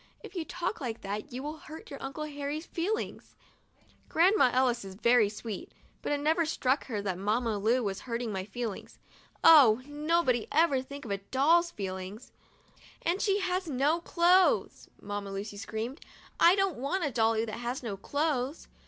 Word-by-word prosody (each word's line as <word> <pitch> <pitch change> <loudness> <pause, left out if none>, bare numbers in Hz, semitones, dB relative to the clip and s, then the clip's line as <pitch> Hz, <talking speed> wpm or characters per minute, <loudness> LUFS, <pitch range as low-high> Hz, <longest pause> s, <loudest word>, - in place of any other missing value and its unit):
If - - -10
you 345 -4 -3
talk 335 - -4
like 235 -4 -4
that 205 +1 -5
you 255 +2 -5
will 300 +2 -5
hurt 315 +1 -11
your 280 - -8
Uncle 275 +3 -5
Harry's 295 +1 -4
feel 360 +6 -1 1.1
Grandma 360 -3 +4
Ellis 250 -2 +2
is 190 -1 -9
very 235 0 +4
sweet, 220 - -7 0.3
but - - -3
it 290 - +1
never 320 +4 +2
struck 275 -3 0
her 210 -6 -3
that 185 -3 -2
Mamma 215 +2 0
Lu 235 +5 +2
was 195 -2 -2
hurting 235 -2 -3
my 190 -2 -3
feelings. 215 +1 -6 0.5
Oh! 255 -8 +8
nobody 295 -4 +1
ever 300 -4 +3
thinks 280 +1 -9
of 215 - -5
a 200 - 0
doll's 310 - +3
feelings! 190 - -6 0.7
"And 350 +4 0
she 400 -1 +2
has 365 -1 -1
no 290 +5 +2
clothes," 355 +2 +3
Mamma 205 0 -5
Lucy 205 +1 -5
screamed. 225 +6 -5 0.4
I 345 +2 +7
don't 390 -8 0
want 320 +7 -1
a 285 - -1
dolly 225 -1 +2
that 215 0 -6
has 245 +2 -4
no 215 -4 -3
clothes!' 285 - -2
260 Hz, 170 wpm, -30 LUFS, 220-320 Hz, 1.1 s, Oh